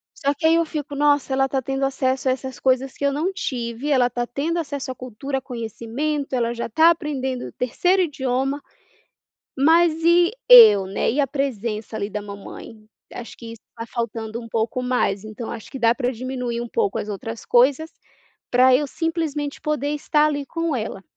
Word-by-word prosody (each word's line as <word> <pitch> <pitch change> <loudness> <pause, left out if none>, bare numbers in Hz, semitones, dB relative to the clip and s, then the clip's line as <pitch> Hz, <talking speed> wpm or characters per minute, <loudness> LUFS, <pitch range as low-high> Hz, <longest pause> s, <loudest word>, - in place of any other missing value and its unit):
Só 280 -1 0
que 320 +3 -5
aí 325 +1 +5
eu 335 0 +2
fico: 295 -2 -5
nossa 290 -1 +2
ela 270 0 +3
está 270 0 -1
tendo 270 +2 -1
acesso 265 -1 -1
a - - +4
essas 260 -1 -7
coisas 260 0 +1
que 285 - -4
eu 280 - +3
não 320 +7 -1
tive, 245 - -4
ela 260 -4 +4
está 240 0 -3
tendo 315 +8 -2
acesso 285 -4 -4
à - - -7
cultura, 255 +3 -5
conhecimento, 255 +4 -4
ela 235 -2 0
já 235 - -4
está 315 +9 +5
aprendendo 275 -6 -2
o - - -10
terceiro 360 +10 +1
idioma, 270 -3 -1 1.0
mas 325 +3 +4
e 345 +2 +5 0.2
eu, 215 -5 +9
né? 195 +1 -1
E 285 +5 +1
a 275 - +1
presença 230 -6 -3
ali 200 -1 -3
da 210 0 -4
mamãe? 205 +2 -10 0.3
Acho 235 - -9
que 235 - -11
isso 230 - -15
está 230 0 -8
faltando 230 -1 -4
um 230 - -11
pouco 225 +3 -1
mais. 245 -6 0
Então, 215 +2 -7
acho 220 - -8
que 270 - -6
dá 230 0 +3
pra 250 -1 -1
diminuir 250 -1 -4
um 240 - -4
pouco 415 - -1
as - - -5
outras 220 +2 -6
coisas, 270 +6 +3 0.6
pra 255 +1 +5
eu 295 +2 -1
simplesmente 310 -2 -3
poder 300 -2 -1
estar 300 0 +2
ali 290 -2 -2
com 330 -2 -2
ela. 215 -4 -5
265 Hz, 195 wpm, -22 LUFS, 235-295 Hz, 1.0 s, eu